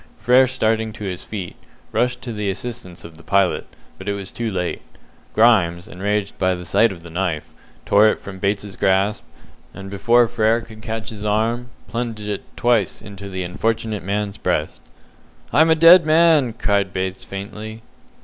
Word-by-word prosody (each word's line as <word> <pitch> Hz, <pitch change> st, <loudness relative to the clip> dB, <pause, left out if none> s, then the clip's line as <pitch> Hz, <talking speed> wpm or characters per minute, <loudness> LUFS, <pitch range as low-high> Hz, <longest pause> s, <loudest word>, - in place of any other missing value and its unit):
Frere, 130 Hz, +1 st, +5 dB
starting 110 Hz, -3 st, 0 dB
to 105 Hz, -, -9 dB
his 90 Hz, -3 st, -4 dB
feet, 95 Hz, -5 st, -6 dB, 0.4 s
rushed 125 Hz, 0 st, 0 dB
to 120 Hz, -1 st, -5 dB
the 105 Hz, -2 st, -2 dB
assistance 95 Hz, -3 st, -6 dB
of 80 Hz, -2 st, -12 dB
the 85 Hz, -, -15 dB
pilot, 100 Hz, +2 st, +1 dB, 0.3 s
but 95 Hz, -, -10 dB
was 100 Hz, -2 st, -3 dB
too 115 Hz, -1 st, -3 dB
late. 90 Hz, -3 st, -3 dB, 0.5 s
Grimes, 95 Hz, -7 st, +3 dB
enraged 100 Hz, +2 st, -2 dB
by 95 Hz, -1 st, +2 dB
the 90 Hz, 0 st, -8 dB
sight 110 Hz, +7 st, +3 dB
of 85 Hz, -3 st, -10 dB
the 85 Hz, -, -10 dB
knife, 85 Hz, -3 st, -2 dB, 0.3 s
tore 105 Hz, +2 st, +5 dB
it -, -, +1 dB
from 95 Hz, -1 st, -9 dB
Bates's 100 Hz, 0 st, -2 dB
grasp, 95 Hz, +2 st, +1 dB, 0.5 s
and 95 Hz, 0 st, -8 dB
before 120 Hz, +4 st, +4 dB
Frere 115 Hz, 0 st, +2 dB
could 110 Hz, -1 st, -13 dB
catch 110 Hz, 0 st, -4 dB
his 105 Hz, -2 st, -8 dB
arm, 115 Hz, +4 st, 0 dB, 0.2 s
plunged 115 Hz, -2 st, -4 dB
it 105 Hz, -2 st, -3 dB, 0.2 s
twice 120 Hz, -6 st, +1 dB
into 100 Hz, -1 st, -9 dB
the 95 Hz, -1 st, -4 dB
unfortunate 110 Hz, +3 st, -2 dB
man's 100 Hz, +2 st, -3 dB
breast. 80 Hz, -4 st, -1 dB, 0.7 s
"I'm 160 Hz, +2 st, +5 dB
a 160 Hz, -, +5 dB
dead 170 Hz, +2 st, +8 dB
man!" 155 Hz, -5 st, +4 dB
cried 100 Hz, -3 st, 0 dB
Bates 95 Hz, 0 st, -3 dB
faintly. 110 Hz, +3 st, -7 dB
105 Hz, 170 wpm, -21 LUFS, 95-115 Hz, 0.7 s, dead